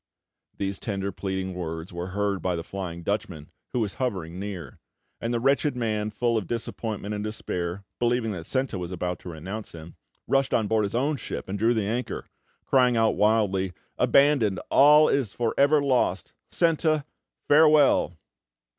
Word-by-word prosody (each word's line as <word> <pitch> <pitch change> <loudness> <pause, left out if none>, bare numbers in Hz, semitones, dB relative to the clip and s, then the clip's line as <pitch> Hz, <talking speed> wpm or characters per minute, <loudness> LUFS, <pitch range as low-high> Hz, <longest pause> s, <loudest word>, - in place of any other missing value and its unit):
These 100 -1 -2
tender, 100 -2 -3
pleading 95 0 -3
words 80 -1 -5
were 85 +1 -4
heard 100 0 -1
by 90 0 0
the 85 - -4
Flying 85 -2 -6
Dutchman, 95 -6 -3 0.2
who 125 - 0
was 105 -3 -2
hovering 95 -8 -2
near; 95 -7 -7 0.4
and 115 - -2
the 120 - 0
wretched 140 +3 +2
man, 110 -3 -1
full 115 +1 0
of 95 - -8
disappointment 110 -3 -4
and 105 0 -3
despair, 95 -4 -4 0.2
believing 120 -2 +1
that 85 -4 -6
Senta 130 -7 -1
was 90 0 -5
about 90 -1 -3
to - - -9
renounce 95 +7 -7
him, 80 0 -11 0.3
rushed 135 0 +2
on 110 - +2
board 110 0 +1
his 100 - -4
own 140 +4 +1
ship - - -6
and 100 +2 -4
drew 115 +3 +3
the 110 -3 0
anchor, 120 +5 -3 0.4
crying 125 -3 +3
out 115 -1 +4
wildly: 100 -4 +1 0.3
"Abandoned! 140 -8 +4
All 150 +2 +7
is 130 -8 0
for 120 -2 -1
ever 145 +1 +4
lost! 125 -9 0 0.2
Senta, 155 -3 +2 0.4
farewell!" 150 - +5
105 Hz, 165 wpm, -26 LUFS, 95-125 Hz, 0.4 s, All